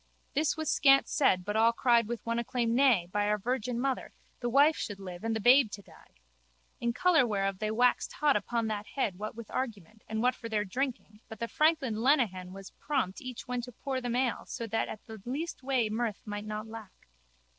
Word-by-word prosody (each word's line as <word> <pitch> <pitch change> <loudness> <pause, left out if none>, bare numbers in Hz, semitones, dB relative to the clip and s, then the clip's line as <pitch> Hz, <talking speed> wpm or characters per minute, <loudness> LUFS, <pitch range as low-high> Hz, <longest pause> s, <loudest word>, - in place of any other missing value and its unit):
This 305 +1 +1
was 315 -1 -3
scant 275 -2 +5
said 185 - +2
but 205 +1 -2
all 225 +1 +5
cried 235 -2 +3
with 235 0 -5
one 230 0 0
acclaim 235 -1 -1
nay, 240 -9 +4
by 205 +1 +1
our 210 0 +2
Virgin 240 +2 -2
Mother, 265 0 -2 0.3
the 240 - -2
wife 285 +5 +5
should 205 -2 -5
live 180 -1 -8
and 225 0 -1
the - - -1
babe 245 +2 +6
to 200 - -7
die. - - -19 0.6
In 235 - 0
colour 345 +2 +4
whereof 195 -3 -1
they 215 - -1
waxed 245 +3 +2
hot 295 -2 +2
upon 235 -2 -1
that 210 -1 -3
head 205 -9 -1
what 215 +1 -5
with 230 -2 -9
argument 220 -4 -5
and 220 0 -2
what 250 +1 +4
for 230 -2 -8
their 210 -1 0
drinking 235 -1 -4
but 220 - -8
the 230 - -2
franklin 275 -7 +1
Lenehan 220 -10 +2
was 195 0 -10
prompt 260 -11 -2
each 255 -1 -7
when 250 0 -2
to 250 +1 -8
pour 260 +2 -4
them 245 -1 -2
ale 250 -1 0
so 230 - -5
that 225 0 -1
at 215 - -8
the 220 -2 -10
least 285 +8 -4
way 255 -4 +1
mirth 220 -1 -2
might 205 -1 -5
not 215 +1 -4
lack. 220 -3 -11
230 Hz, 215 wpm, -30 LUFS, 210-260 Hz, 0.6 s, babe